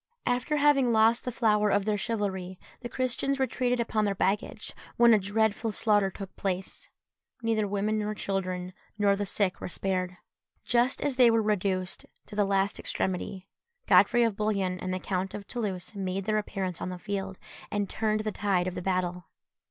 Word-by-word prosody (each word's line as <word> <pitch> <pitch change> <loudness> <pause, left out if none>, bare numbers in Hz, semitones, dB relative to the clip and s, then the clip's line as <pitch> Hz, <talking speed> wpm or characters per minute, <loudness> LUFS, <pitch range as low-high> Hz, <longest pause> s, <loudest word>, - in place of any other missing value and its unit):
After 250 +5 0
having 285 -4 +4
lost 225 +1 +4
the 250 - -1
flower 210 -3 +2
of 200 0 +2
their 215 -1 +1
chivalry, 190 -4 -2 0.2
the 240 - -6
Christians 255 +2 0
retreated 250 -1 0
upon 225 -2 0
their 200 -1 0
baggage, 195 +2 -1 0.2
when 235 -1 +7
a 215 - +5
dreadful 220 +2 0
slaughter 205 -2 +2
took 195 0 -9
place. 190 -1 -3 0.5
Neither 220 -2 +1
women 205 +2 0
nor 210 0 -2
children, 185 -2 -3 0.2
nor 200 -1 +3
the 205 0 -3
sick, 190 -1 0
were - - -3
spared. 185 0 -2 0.5
Just 245 +2 +2
as 275 -3 -1
they 250 -2 +7
were 225 -1 +3
reduced 190 -3 -1 0.2
to - - -10
the 205 -1 +3
last 195 0 +1
extremity, 190 +1 -3 0.4
Godfrey 205 +6 +5
of 225 -3 +1
Bouillon 195 -4 0
and 185 - -3
the 185 - -1
Count 185 0 -3
of 205 -1 -7
Toulouse 205 -5 -3
made 195 -1 -3
their 215 0 +2
appearance 190 -4 -4
on - - -2
the 180 - -5
field, 195 -1 -4 0.3
and 205 -1 -1
turned 215 +1 0
the 215 0 -2
tide 195 -4 0
of 180 -1 -4
battle. 180 -1 -1
205 Hz, 175 wpm, -28 LUFS, 190-220 Hz, 0.5 s, when